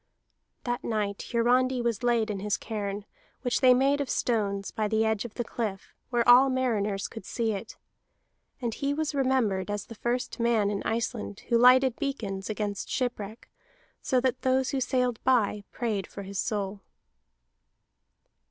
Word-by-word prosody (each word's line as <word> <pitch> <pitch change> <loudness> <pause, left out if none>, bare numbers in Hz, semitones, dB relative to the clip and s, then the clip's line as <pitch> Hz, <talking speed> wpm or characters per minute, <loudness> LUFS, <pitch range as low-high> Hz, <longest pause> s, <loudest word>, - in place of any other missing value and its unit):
That 245 +1 -2
night 210 -3 -2
Hiarandi 250 +2 +3
was 235 -2 -1
laid 235 -3 +2
in 200 - -4
his 205 +1 0
cairn, 205 -2 -4 0.4
which 250 0 0
they 255 -1 +7
made 275 +3 +3
of 280 - -3
stones, 200 -4 0
by 215 -1 -1
the 220 +1 +2
edge 220 0 0
of 230 - -8
the 240 - -1
cliff 215 -5 -4 0.2
where 240 -2 +1
all 250 +3 +8
mariners 215 -7 0
could 225 - -9
see 230 -2 -1
it. 210 +2 -6 0.8
And 235 -3 -2
he 280 +4 -1
was 310 0 -1
remembered 255 -9 +1
as 205 0 -3
the - - -10
first 240 +3 -2
man 230 -3 +2
in 200 - -2
Iceland 225 -2 -3
who 235 - +4
lighted 255 +1 +6
beacons 220 -10 -3
against 205 -2 -3
shipwreck, 235 -3 -3 0.5
so 255 - +2
that 260 0 0
those 260 0 +2
who 270 - -1
sailed 250 -2 0
by 210 -5 +2
prayed 210 -6 -2
for 200 - -8
his 195 0 -5
soul. 200 -2 -2
230 Hz, 160 wpm, -28 LUFS, 205-255 Hz, 0.8 s, all